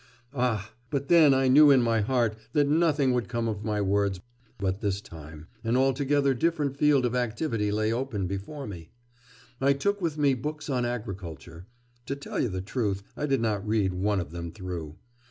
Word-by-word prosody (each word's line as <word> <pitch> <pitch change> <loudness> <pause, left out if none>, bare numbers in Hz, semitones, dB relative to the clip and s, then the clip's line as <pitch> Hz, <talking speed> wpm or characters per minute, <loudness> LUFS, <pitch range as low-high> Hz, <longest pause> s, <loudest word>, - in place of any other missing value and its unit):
'Ah, 115 -5 -1 0.2
but 140 -1 -3
then 165 -4 +7
I 135 0 +3
knew 145 +3 +7
in 135 -3 +6
my 115 -1 +2
heart 115 -1 +1 0.2
that 145 -2 +3
nothing 150 -4 +2
would 125 -1 -1
come 115 -2 -1
of 105 -2 -3
my 105 -1 -1
words; 100 -1 +1 0.4
but 95 0 -2
this 100 -2 -1
time... 80 -4 -11 0.2
an 115 +2 +1
altogether 140 +1 +2
different 145 0 0
field 140 -2 +3
of 120 - -1
activity 115 -3 -1
lay 110 +1 0
open 120 -6 -2
before 100 +10 -5
me.... 85 -7 -9 0.7
I 140 +1 +4
took 200 +8 -1
with 165 -3 -1
me 145 -2 +3
books 150 +4 -4
on 125 -2 0
agriculture... 90 - -6 0.4
to 140 - -2
tell 140 - -4
the 95 -1 -3
truth, 100 -1 -2
I 150 - -2
did 135 -4 +1
not 105 -3 -1
read 105 -4 +1
one 100 +2 0
of 85 -4 -5
them 85 -1 -6
through.... 90 -6 -6
115 Hz, 185 wpm, -27 LUFS, 100-140 Hz, 0.7 s, then